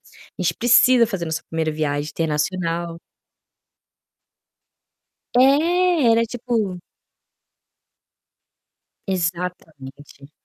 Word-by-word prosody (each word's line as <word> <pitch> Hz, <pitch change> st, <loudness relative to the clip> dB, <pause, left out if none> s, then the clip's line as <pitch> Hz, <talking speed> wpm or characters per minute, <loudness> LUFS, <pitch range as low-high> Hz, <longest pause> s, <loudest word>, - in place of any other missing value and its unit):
a -, -, -16 dB
gente 175 Hz, -2 st, 0 dB
precisa 245 Hz, +2 st, +5 dB
fazer 195 Hz, -6 st, -4 dB
nossa 160 Hz, -1 st, -4 dB
1º 160 Hz, -1 st, -2 dB
viagem 150 Hz, -1 st, -2 dB
internacional". 165 Hz, +2 st, -2 dB, 2.4 s
É, 310 Hz, +2 st, +3 dB
era 230 Hz, 0 st, +3 dB
tipo 220 Hz, -6 st, -3 dB, 2.3 s
Exatamente. 160 Hz, -6 st, -6 dB
180 Hz, 70 wpm, -21 LUFS, 160-235 Hz, 2.4 s, precisa